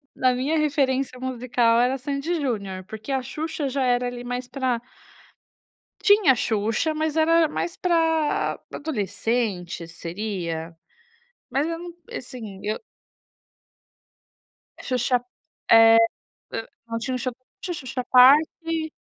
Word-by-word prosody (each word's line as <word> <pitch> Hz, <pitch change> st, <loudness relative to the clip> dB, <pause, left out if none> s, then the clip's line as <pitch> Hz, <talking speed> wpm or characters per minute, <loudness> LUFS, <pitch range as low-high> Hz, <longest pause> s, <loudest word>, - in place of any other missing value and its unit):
Na 255 Hz, -1 st, +3 dB
minha 275 Hz, +6 st, 0 dB
referência 275 Hz, -4 st, +1 dB
musical 245 Hz, -2 st, +1 dB
era 255 Hz, +2 st, +2 dB
Sandy 280 Hz, +4 st, -3 dB
e 335 Hz, -, 0 dB
Junior, 200 Hz, -8 st, -3 dB
porque 220 Hz, +5 st, -7 dB
a 265 Hz, -1 st, +1 dB
Xuxa 300 Hz, +1 st, -3 dB
já 270 Hz, +1 st, -1 dB
era 245 Hz, 0 st, +2 dB
ali 245 Hz, 0 st, -6 dB
mais 245 Hz, +1 st, -3 dB
para 255 Hz, -4 st, -1 dB, 1.2 s
Tinha 410 Hz, -, +5 dB
Xuxa 225 Hz, +8 st, 0 dB
mas 310 Hz, 0 st, -1 dB
era 325 Hz, 0 st, +4 dB
mais 335 Hz, +3 st, -3 dB
para 325 Hz, -3 st, +1 dB
para -, -, -6 dB
adolescente, 205 Hz, -, -2 dB
seria? 170 Hz, -2 st, -5 dB, 0.8 s
Mas 275 Hz, +5 st, +1 dB
eu 330 Hz, 0 st, -3 dB
não 345 Hz, 0 st, -8 dB, 0.2 s
assim, 220 Hz, -6 st, -7 dB
eu. 215 Hz, -, -1 dB, 2.0 s
Xuxa, 250 Hz, -1 st, +1 dB, 0.5 s
eh, 225 Hz, 0 st, +8 dB, 0.9 s
não 230 Hz, 0 st, -3 dB
tinha 255 Hz, +3 st, -2 dB
o -, -, 0 dB
show 255 Hz, +1 st, -2 dB
da -, -, -45 dB, 0.2 s
Xuxa, 345 Hz, -7 st, -5 dB
Xuxa 250 Hz, +1 st, -3 dB
parque 315 Hz, +5 st, +5 dB
255 Hz, 125 wpm, -24 LUFS, 225-305 Hz, 2.0 s, eh